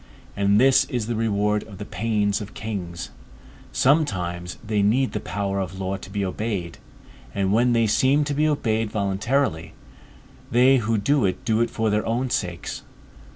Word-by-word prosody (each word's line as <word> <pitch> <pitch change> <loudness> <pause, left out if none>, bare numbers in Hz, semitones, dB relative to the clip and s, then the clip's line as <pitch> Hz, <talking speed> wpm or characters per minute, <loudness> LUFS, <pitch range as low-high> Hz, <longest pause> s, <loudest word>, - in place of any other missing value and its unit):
And 100 +1 +3
this 135 +1 +5
is 120 -4 -3
the 120 - -2
reward 105 -2 +1
of 100 -3 -11
the 105 - -6
pains 105 -1 0
of 105 0 -9
kings; 90 -6 -5 0.6
sometimes 90 - +1
they 105 -1 +1
need 125 +6 +2
the - - -3
power 100 -1 -3
of 95 0 -4
law 95 0 -2
to 95 - -11
be 100 0 -2
obeyed; 95 -3 -3 0.6
and 100 0 +1
when 120 +2 +3
they 115 -1 +3
seem 130 +7 +3
to 145 0 -2
be 150 +2 +2
obeyed 115 -7 0
voluntarily, 100 - -1 0.8
they 130 +3 +5
who 115 -1 0
do 140 +7 +2
it 95 +7 -2
do 110 -1 +2
it 120 - +1
for 110 -1 -1
their 105 +1 +1
own 120 +3 -1
sakes. 90 -6 -3
105 Hz, 170 wpm, -24 LUFS, 100-120 Hz, 0.8 s, this